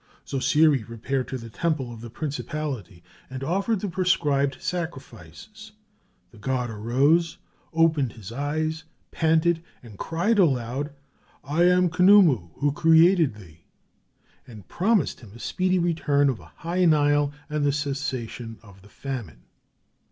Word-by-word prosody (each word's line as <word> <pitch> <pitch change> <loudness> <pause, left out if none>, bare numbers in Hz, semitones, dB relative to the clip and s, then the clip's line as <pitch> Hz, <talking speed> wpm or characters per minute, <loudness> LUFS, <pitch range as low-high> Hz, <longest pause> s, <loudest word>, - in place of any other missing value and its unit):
Zosiri 145 +1 +3
repaired 125 +3 -3
to 130 - -4
the 115 -2 -10
temple 135 +1 -2
of 115 - -11
the 120 - -8
principality 140 - -5 0.3
and 130 +1 -6
offered 195 - 0
the 205 - -2
prescribed 150 -7 +1
sacrifices; 170 - -7 0.6
the 115 - -17
god 125 +1 -2
arose, 135 +10 +1 0.3
opened 160 -7 +2
his 110 -2 -10
eyes, 155 +4 -2 0.3
panted, 165 +1 +2 0.2
and 110 -5 -13
cried 190 +7 0
aloud, 135 -3 +1 0.5
"I 155 +6 +1
am 180 0 +4
Khnumu 180 - +5
who 145 0 0
created 165 - +4
thee!" 85 -6 -15 0.9
and 110 -7 -12
promised 200 -2 +1
him 110 -5 -14
a - - -12
speedy 185 +10 0
return 155 -5 +2
of 125 - -2
a - - -15 0.2
high 180 +2 +1
Nile 145 -2 +3 0.2
and 150 -1 -2
the 145 - +3
cessation 135 -5 -4
of 100 -3 -16
the 105 - -18
famine. 110 - -7
145 Hz, 135 wpm, -25 LUFS, 120-165 Hz, 0.9 s, Khnumu